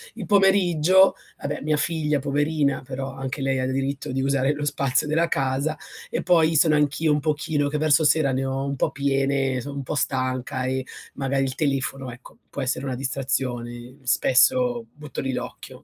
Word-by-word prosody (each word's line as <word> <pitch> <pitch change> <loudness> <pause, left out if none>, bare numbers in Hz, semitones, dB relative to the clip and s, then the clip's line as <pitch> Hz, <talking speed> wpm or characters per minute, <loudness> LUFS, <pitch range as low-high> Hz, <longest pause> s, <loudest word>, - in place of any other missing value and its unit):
Il 210 -6 -6
pomeriggio, 190 -2 +4 0.2
vabbè 145 +1 -4
mia 155 +1 0
figlia 150 -2 0
poverina, 145 0 0
però 135 0 -5
anche 135 +1 -5
lei 135 -1 0
ha 130 - 0
diritto 135 0 -2
di 135 +1 -1
usare 135 0 +1
lo 145 0 -4
spazio 140 0 0
della 165 +2 +1
casa 140 +3 -1 0.3
e - - -2
poi 165 -3 +4
sono 155 -1 +4
anch'io 150 +1 +2
un 150 - 0
pochino 150 -1 0
che 150 - -2
verso 155 +1 +3
sera 150 -2 +3
ne 130 +1 0
ho 135 +1 -2
un 140 0 -2
po' - - 0
piene, 135 -1 0
sono 140 +2 -7
un 140 - -3
po' 150 - -4
stanca 130 -1 -2
e 130 0 -1 0.3
magari 135 0 0
il 130 -1 -2
telefono, 135 -3 -2
ecco, 120 +2 -14
può 140 - -5
essere 130 +1 -2
una 130 -2 -2
distrazione. 130 -1 -3
Spesso 240 - +3
butto 150 -1 -7
lì 135 -1 -2
l'occhio. - - -7
140 Hz, 180 wpm, -24 LUFS, 130-155 Hz, 0.3 s, pomeriggio